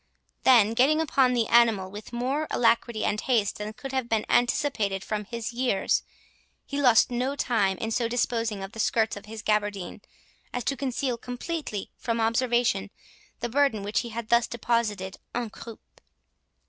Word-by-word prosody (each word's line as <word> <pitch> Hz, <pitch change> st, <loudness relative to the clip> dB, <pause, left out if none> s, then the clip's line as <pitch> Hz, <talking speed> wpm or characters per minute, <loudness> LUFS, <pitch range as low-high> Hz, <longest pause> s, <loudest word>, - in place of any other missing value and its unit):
Then 225 Hz, -4 st, +6 dB
getting 275 Hz, +7 st, +4 dB
upon 270 Hz, -5 st, +3 dB
the 235 Hz, -2 st, +2 dB
animal 225 Hz, -6 st, +3 dB
with 210 Hz, +3 st, -9 dB
more 265 Hz, +6 st, -1 dB
alacrity 230 Hz, -1 st, +1 dB
and 210 Hz, -, 0 dB
haste 225 Hz, -7 st, +1 dB
than 210 Hz, +1 st, -5 dB
could 270 Hz, +4 st, -8 dB
have 260 Hz, -3 st, -2 dB
been 220 Hz, -1 st, +1 dB
anticipated 220 Hz, -6 st, +1 dB
from 210 Hz, -1 st, -3 dB
his 230 Hz, +2 st, -5 dB
years, 240 Hz, -5 st, +1 dB, 0.6 s
he 285 Hz, 0 st, -3 dB
lost 245 Hz, -2 st, +5 dB
no 255 Hz, +3 st, -1 dB
time 205 Hz, -9 st, +1 dB
in 225 Hz, -, -3 dB
so 230 Hz, +1 st, +1 dB
disposing 230 Hz, -3 st, -1 dB
of 195 Hz, -, -7 dB
the 225 Hz, -, -10 dB
skirts 220 Hz, 0 st, +1 dB
of 205 Hz, -, -10 dB
his 220 Hz, 0 st, -8 dB
gabardine 205 Hz, -4 st, -1 dB, 0.5 s
as 245 Hz, -, -2 dB
to 275 Hz, -, -1 dB
conceal 260 Hz, -2 st, -2 dB
completely 250 Hz, -, -5 dB
from 230 Hz, -1 st, -2 dB
observation 230 Hz, -3 st, +1 dB, 0.5 s
the 240 Hz, -, -1 dB
burden 270 Hz, -5 st, +2 dB
which 205 Hz, +1 st, 0 dB
he 240 Hz, -, -4 dB
had 230 Hz, 0 st, -6 dB
thus 235 Hz, 0 st, +4 dB
deposited 215 Hz, -5 st, -1 dB, 0.2 s
"en 240 Hz, -3 st, -2 dB
croupe". 230 Hz, 0 st, -13 dB
230 Hz, 165 wpm, -26 LUFS, 210-250 Hz, 0.6 s, Then